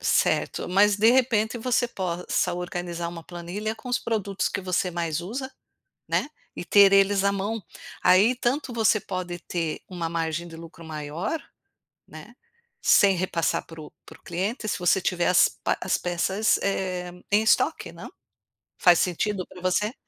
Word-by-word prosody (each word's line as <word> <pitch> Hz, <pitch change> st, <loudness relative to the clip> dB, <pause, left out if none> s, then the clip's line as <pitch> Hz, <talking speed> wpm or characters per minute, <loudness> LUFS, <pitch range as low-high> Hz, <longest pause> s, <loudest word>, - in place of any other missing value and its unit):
Certo, -, -, +1 dB
mas 200 Hz, +3 st, +4 dB
de 220 Hz, +3 st, +5 dB
repente 240 Hz, -3 st, +2 dB
você 245 Hz, +1 st, +1 dB
possa 180 Hz, -2 st, -2 dB
organizar 175 Hz, -1 st, -4 dB
uma 170 Hz, -1 st, -8 dB
planilha 180 Hz, +6 st, -5 dB
com 225 Hz, +3 st, -11 dB
os 245 Hz, -, +1 dB
produtos 205 Hz, -4 st, -2 dB
que -, -, -3 dB
você 185 Hz, 0 st, -1 dB
mais 170 Hz, -2 st, -2 dB
usa, 255 Hz, +9 st, -5 dB, 0.6 s
né, -, -, 0 dB, 0.3 s
e -, -, -6 dB
ter 200 Hz, 0 st, +6 dB
eles 195 Hz, 0 st, +4 dB
à 200 Hz, -, +3 dB
mão. 205 Hz, +3 st, -3 dB, 0.4 s
Aí 205 Hz, +7 st, +5 dB
tanto 250 Hz, +1 st, -1 dB
você 220 Hz, -1 st, +3 dB
pode 180 Hz, -3 st, -5 dB
ter 165 Hz, -2 st, -3 dB
uma 175 Hz, -3 st, -4 dB
margem 165 Hz, 0 st, -2 dB
de 165 Hz, -, -11 dB
lucro 165 Hz, 0 st, -12 dB
maior, 160 Hz, -, -4 dB, 0.7 s
né, -, -, -12 dB, 0.5 s
sem 195 Hz, -2 st, +5 dB
repassar 175 Hz, -2 st, -1 dB
para 165 Hz, -1 st, -11 dB
o 150 Hz, -, -10 dB
para 160 Hz, -, -14 dB
o -, -, -33 dB
cliente, 205 Hz, +6 st, -3 dB
se -, -, -1 dB
você 180 Hz, +1 st, +2 dB
tiver 175 Hz, -1 st, 0 dB
as 180 Hz, -, +5 dB
pe -, -, -2 dB
as -, -, 0 dB
peças 190 Hz, +4 st, +1 dB, 0.7 s
em 210 Hz, +1 st, +5 dB
estoque 220 Hz, -, +2 dB
não? -, -, -10 dB, 0.7 s
Faz 175 Hz, -2 st, +6 dB
sentido 185 Hz, +2 st, -1 dB
para 180 Hz, -, -13 dB
você? 195 Hz, +5 st, 0 dB
185 Hz, 160 wpm, -25 LUFS, 175-215 Hz, 0.7 s, ter